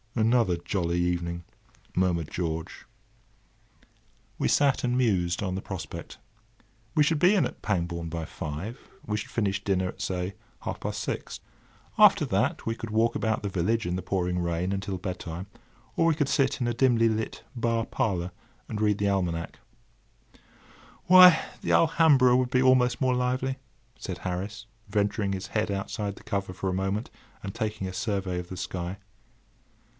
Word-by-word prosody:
"Another 115 -5 +3
jolly 85 -1 -1
evening!" 85 -1 -1 0.5
murmured 85 -4 +1
George. 80 -2 -4 1.5
We - - +2
sat 140 -2 +3
and 125 0 +1
mused 90 -8 +1
on 95 -2 -2
the 95 - -3
prospect. 95 -5 -7 0.8
We 150 - +5
should 150 +1 +2
be 180 +6 +5
in 195 - +3
at - - -6
Pangbourne 85 -4 -2
by 80 0 -4
five. 80 +12 -5 0.3
We 105 - -1
should 105 - -4
finish 100 -3 -1
dinner 95 -2 +1
at, - - -9
say, 90 +1 -2 0.3
half - - -4
past - - -3
six. - - -4 0.6
After - - +7
that - - 0
we 115 - -1
could 115 - -7
walk 115 +2 +2
about 110 -1 0
the - - -1
village 100 +4 0
in 90 - -1
the 95 - -2
pouring 90 -1 -1
rain 85 +1 -1
until 95 -1 -3
bed 90 0 -4
time; 85 +2 -6 0.5
or 165 - +3
we 165 - +3
could 145 -3 +1
sit 135 -2 +2
in 120 - 0
a 120 - 0
dimly 115 -1 +4
lit 110 0 -2
bar 115 -1 0
parlour 90 -6 -1 0.4
and 105 -1 -4
read 105 -1 +3
the 100 - 0
almanac. 90 -4 0
[Picture: - - -25
Lady - - -33
in - - -30
skirt] - - -26
"Why, 180 -2 +8 0.2
the - - -1
Alhambra 155 -6 +5
would 125 0 +2
be 125 0 +3
almost 130 -1 +4
more 130 -1 +3
lively," 130 +1 -1 0.4
said 90 -3 -5
Harris, 95 +5 -4 0.2
venturing 105 -1 0
his 95 0 -4
head 110 0 -1
outside 100 +1 -3
the - - -15
cover 100 -3 -3
for 95 +1 -3
a - - -1
moment 95 +4 -2 0.3
and 100 - -5
taking 110 -4 -3
a 95 - -6
survey 95 -2 -2
of 90 0 -7
the 95 - -6
sky. 90 +1 -4
100 Hz, 175 wpm, -27 LUFS, 90-115 Hz, 1.5 s, Why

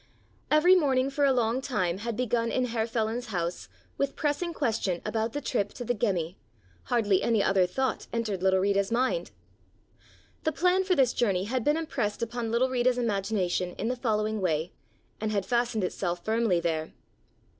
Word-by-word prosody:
Every 305 +5 +6
morning 270 -5 +2
for 285 +1 +2
a 275 - +4
long 240 0 +1
time 190 -9 -1
had 230 0 -4
begun 235 -2 0
in 255 - +1
Herr 230 -2 -1
Feland's 230 +1 -2
house 175 -4 -3 0.3
with 280 0 0
pressing 305 +3 -1
question 220 - -1
about 220 +1 -1
the 290 - -3
trip 205 -7 -1
to 245 - -6
the 245 - +1
Gemmi, 185 -6 -1 0.5
hardly 210 -6 +2
any 225 -4 +2
other 190 -2 +3
thought 265 +8 -2
entered 220 -5 -2
little 190 0 +3
Rita's 200 +1 +1
mind. 260 - 0 1.1
The 315 - +1
plan 360 +4 +3
for 370 -1 +2
this 260 -5 +3
journey 195 -6 +1
had 245 +4 -2
been 295 +5 +2
impressed 245 -11 -2
upon 235 0 -3
little 240 +3 +2
Rita's 250 0 +2
imagination 195 -5 -1
in 225 - -2
the 250 - 0
following 215 -3 -1
way, 160 -2 0 0.5
and 215 0 -2
had 200 -2 0
fastened 235 -3 0
itself 175 -1 -3
firmly 220 -5 +2
there. 160 -2 -2
230 Hz, 175 wpm, -28 LUFS, 195-255 Hz, 1.1 s, Every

